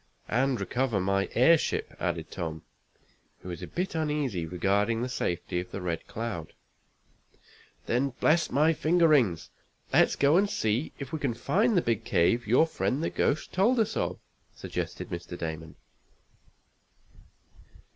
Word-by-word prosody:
"And 130 +2 +1
recover 125 -5 0
my 100 +1 0
airship," 160 +6 +3
added - - -3
Tom, 80 -2 -5 0.8
who 90 - -7
was 85 -2 -6
a - - -6
bit 180 +2 -3
uneasy 150 - -1
regarding 100 +6 +1
the - - -1
safety 90 -6 -2
of 90 - -6
the - - -6
Red 85 -3 -4
Cloud. 105 -8 -5 1.3
"Then, 125 +4 +1
bless 170 +2 +3
my 155 +5 +3
finger 165 +2 +3
rings! 115 - +2 0.4
let's - - +4
go 145 +4 +4
and 200 +1 +3
see 115 - -1
if 135 0 -8
we 160 - -2
can 135 -5 -1
find 205 - +2
the 175 - +3
big 115 -1 0
cave 105 +6 +2
your 125 +8 +5
friend 155 -2 -2
the - - -1
ghost 150 - 0
told 230 +7 +3
us 220 - +1
of," - - -1 0.4
suggested - - -5
Mr. 85 0 -6
Damon. 80 -1 -6
120 Hz, 145 wpm, -28 LUFS, -, 1.3 s, your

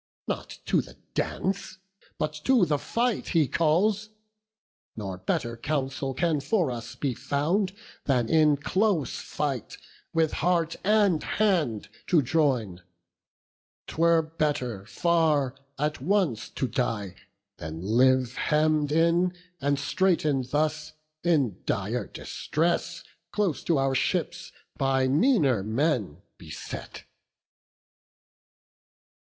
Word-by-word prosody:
Not - - -4
to - - +2
the - - -14 0.2
dance, 195 0 -2 0.4
but 155 - -1
to 255 -8 +5
the 150 -3 0
fight 235 +5 -1
he 155 -4 +4
calls; 190 - +2 0.9
Nor 95 -4 -5
better 120 +5 -1
counsel 135 +1 -2
can 165 0 +1
for 175 - +1
us 120 +1 -6
be 135 0 -1
found, 170 - 0 0.3
Than 125 -5 +2
in 150 +1 +4
close 185 +1 0
fight 140 -6 -3 0.3
with 160 -2 +2
heart 170 -1 +1
and 205 -5 +3
hand 170 - 0 0.2
to 165 -5 +4
join. 125 - +1 1.0
'Twere 165 0 +3
better 145 -10 -2
far 155 -4 +2 0.2
at 150 -1 -1
once 170 - +1
to 130 - -2
die, 115 -8 -2 0.4
than 80 +2 -6
live 125 +4 +3
Hemm'd 150 -1 +2
in 170 +3 +3 0.2
and 140 0 +1
straiten'd 145 -1 +1
thus, 155 +3 -1 0.3
in 145 - +1
dire - - -1
distress, 170 +2 -2 0.3
Close 200 -8 0
to 165 - +2
our 135 0 +1
ships, 175 +4 -1 0.3
by 135 -1 +2
meaner 145 - +3
men 110 - -1 0.2
beset." - - -8
150 Hz, 110 wpm, -27 LUFS, 130-170 Hz, 1.0 s, to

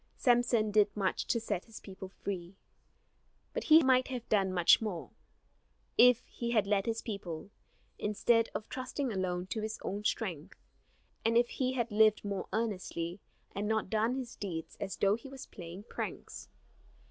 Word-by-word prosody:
Samson 240 -3 +3
did 210 0 +5
much 195 -2 0
to 230 - +2
set 215 -5 -3
his 225 -2 -10
people 190 -1 -9
free; 185 -2 -6 1.0
but - - -3
he 315 0 +8
might 260 -1 +4
have 250 -3 -5
done 195 -3 +3
much 175 +2 +5
more, 200 -7 -4 0.8
if 250 0 +6
he 235 - -5
had 220 -4 +3
led 200 0 +1
his 225 0 -1
people, 195 -4 -6 0.5
instead 230 +2 +2
of 215 - -4
trusting 255 -1 -3
alone 180 -2 -1
to 220 +3 -3
his 220 +1 -3
own 205 +2 -3
strength; 190 -6 -2 0.7
and 230 +1 +3
if 240 0 +4
he 255 -1 -1
had 240 -3 -1
lived 215 0 +4
more 200 -1 -3
earnestly, 185 -5 -2 0.3
and 205 +1 -2
not 220 -3 0
done 220 +3 +2
his 255 -3 -5
deeds 170 -5 -5
as 195 -1 -4
though 195 0 +3
he 235 +5 -5
was 270 -1 -9
playing 175 +1 -9
pranks. - - -6
215 Hz, 165 wpm, -32 LUFS, 190-235 Hz, 1.0 s, he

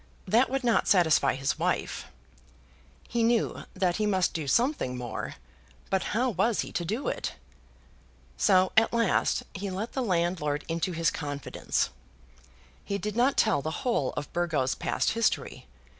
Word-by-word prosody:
That 230 +7 +4
would 270 +1 -1
not 235 -2 +2
satisfy 170 -8 +4
his 135 +1 -1
wife. - - -1 1.0
He 235 - -1
knew 230 0 +1
that 185 -2 +1
he 215 -1 +1
must 190 -3 +1
do 155 -3 -3
something 230 - +1
more; 120 -3 -5 0.6
but 190 -1 +1
how 250 +1 +2
was 215 +3 +1
he - - -6
to 175 - -2
do 215 +11 -3
it? - - -2 1.0
So 185 -2 +4
at 225 +1 +4
last 230 -1 +2
he 195 0 -4
let 195 +5 -4
the 265 - -1
landlord 170 - 0
into 165 +3 -1
his 165 0 +1
confidence. 145 -2 -2 0.9
He 200 - -2
did 210 +1 -4
not 250 +4 +3
tell 145 - +3
the 155 - -3 0.2
whole 235 - +1
of 145 - -5
Burgo's 160 -7 0
past - - 0
history. 230 -1 -1
185 Hz, 155 wpm, -28 LUFS, 160-230 Hz, 1.0 s, That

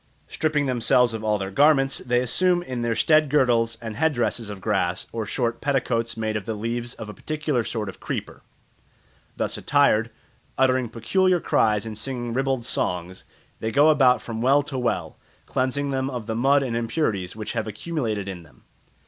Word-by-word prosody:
Stripping 150 -2 0
themselves 125 -1 +3
of 110 -1 -5
all 105 -1 +1
their 95 -1 -4
garments, 135 +2 +3
they 125 0 +1
assume 175 +8 +2
in 125 -7 -4
their 120 -1 0
stead 155 +2 +4
girdles 120 -5 +2
and 110 -2 -5
head 160 +3 +2
dresses 120 -2 -1
of 100 -2 -7
grass, 95 -4 -1
or 110 -2 -4
short 120 0 -2
petticoats 125 -5 0
made 110 -1 -2
of 105 -3 -3
the 110 - -2
leaves 115 +3 -3
of 110 - -8
a 105 - -7
particular 150 -4 -2
sort 110 -2 -3
of 95 - -8
creeper. - - -5 1.0
Thus - - -2
attired, 115 -6 +3 0.5
uttering 130 -2 +2
peculiar 185 - +1
cries 105 -8 +2
and 110 -1 -6
singing 120 +1 -4
ribald 135 -1 -1
songs, 90 -4 -2 0.3
they 110 - -2
go 145 +6 +5
about 130 -5 +4
from 115 -1 -5
well 140 +4 +4
to 135 -2 -4
well, 125 -1 -2 0.3
cleansing 140 +2 -1
them 130 0 -1
of 125 -4 -5
the 110 - -3
mud 135 +5 +3
and 120 -3 -2
impurities 115 - -1
which 110 -1 -5
have - - -2
accumulated 110 - -3
in 95 -3 -6
them. 80 -5 -20
120 Hz, 180 wpm, -24 LUFS, 110-135 Hz, 1.0 s, go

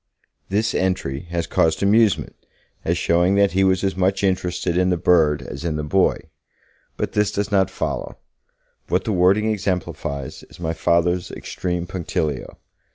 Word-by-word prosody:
This 110 +3 0
entry 90 -5 -1
has 85 -1 -2
caused 80 +4 +1
amusement, 105 0 +3 0.5
as 85 +1 0
showing 85 +3 +2
that 100 0 +4
he 95 +2 +2
was 95 0 +2
as 95 -1 0
much 95 +1 +1
interested 90 -2 0
in 90 +1 +2
the 90 - +1
bird 80 -4 +3
as 70 +5 -7
in 85 -3 -1
the 75 - -2
boy. 95 +6 +2 0.8
But - - -2
this 105 -1 +1
does 100 0 -2
not 95 -2 +3
follow; 95 - -4 0.7
what - - +1
the 110 - -1
wording 100 +4 +3
exemplifies 90 -9 -3
is - - -16
my 80 -1 -2
Father's 85 +2 +1
extreme 90 -1 -4
punctilio. 85 -6 -3
90 Hz, 160 wpm, -22 LUFS, 85-95 Hz, 0.8 s, that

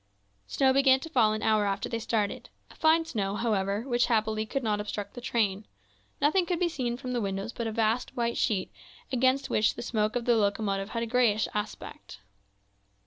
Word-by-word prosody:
Snow 265 - +2
began 265 -1 +5
to 325 - -8
fall 225 -7 +4
an 215 0 -3
hour 215 -2 +3
after 195 0 -2
they 230 - -3
started, 215 -2 -2 0.2
a - - -16
fine 320 +1 +3
snow, 200 -9 -2
however, 205 -2 0
which 240 -2 +1
happily 220 -2 0
could 270 +4 -2
not 210 -2 0
obstruct 205 0 -5
the 245 - -8
train; 215 -5 0 0.6
nothing 340 +5 +2
could 355 -3 -1
be 355 - +2
seen 250 -7 -3
from 255 -1 -6
the 245 -1 -1
windows 195 +2 -3
but 235 - -3
a - - -2
vast, 225 +3 -1
white 235 -1 0
sheet, 200 -6 0 0.4
against 260 +2 +1
which 215 - +2
the - - -6
smoke 215 -2 -1
of 240 -1 -1
the 240 - +4
locomotive 200 -2 0
had 230 -1 -2
a - - -1
greyish 230 -3 +2
aspect. 205 - -6
225 Hz, 200 wpm, -28 LUFS, 210-250 Hz, 0.6 s, began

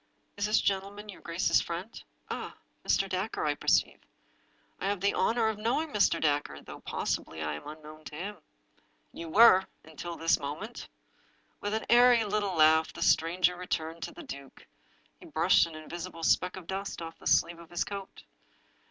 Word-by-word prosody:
" - - -43
Is 200 +1 0
this 215 - +3
gentleman 200 +2 -2
your 195 - -10
grace's 170 +1 +2
friend? 175 +6 -6 0.2
Ah - - -5 0.2
— - - -43
Mr. 195 - +2
Dacre, 190 +1 -2
I 150 - +2
perceive! - - +1 0.8
I - - -2
have 200 -1 0
the 200 +2 +2
honor 230 -1 +2
of 220 -1 -2
knowing 260 +9 0
Mr. 210 -5 +2
Dacre, 145 - 0
though, - - -10
possibly, 80 -1 -3
I 75 0 -2
am 75 - -8
unknown 155 0 -11
to 150 - -8
him." 200 +6 -5 0.8
"You 165 - -7
were 190 0 +7
— - - -42
until 160 +2 -7
this 165 0 +2
moment." 155 +12 -6 0.7
With 205 +1 -2
an 220 - -2
airy 240 -1 +6
little 205 -2 -1
laugh 160 0 +5
the - - -4
stranger 180 +2 +3
returned 165 -2 -4
to - - -4
the - - -11
duke. 140 -1 -10 0.5
He - - -13
brushed - - +4
an 165 - -10
invisible 165 +2 -7
speck 180 +2 +2
of 190 -2 -9
dust 195 +3 -4
off 165 0 -9
the - - -6
sleeve 170 0 +3
of 170 -1 -13
his 175 - -1
coat. 200 -1 -8
180 Hz, 185 wpm, -30 LUFS, 160-205 Hz, 0.8 s, were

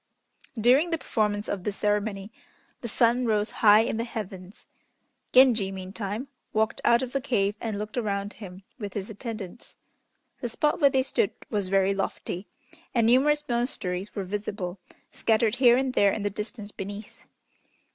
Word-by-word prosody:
During 260 +9 +4
the 330 - 0
performance 210 -7 -1
of 195 -3 -3
this 205 0 -3
ceremony 205 -1 -1 0.5
the 235 - -4
sun 240 +2 +2
rose 215 -1 +1
high 210 0 +8
in 225 -1 -1
the 230 - -1
heavens. 195 -5 -7 0.6
Genji, 235 -7 +5
meantime, 195 +5 -5 0.3
walked 220 +1 0
out 235 +2 +4
of 250 - -4
the 275 - 0
cave 205 -6 +1
and 220 -3 -3
looked 210 +3 -5
around 200 -2 -2
him 190 -2 -10 0.2
with 205 -3 -5
his 205 +1 -4
attendants. 215 -2 -8 0.6
The 240 - -3
spot 300 +8 0
where 280 - +7
they 265 -1 +2
stood 260 - +1 0.2
was 205 -3 -1
very 195 0 +3
lofty, 195 -1 -3 0.5
and 230 -2 +4
numerous 290 +5 +4
monasteries 210 -6 -2
were 200 - -2
visible, 195 -1 -4 0.3
scattered 225 +1 +1
here 245 -2 +6
and 260 -1 0
there 200 -4 +4
in 210 - -3
the 205 - 0
distance 210 +1 -6
beneath. 205 +2 -8
215 Hz, 160 wpm, -27 LUFS, 200-240 Hz, 0.6 s, high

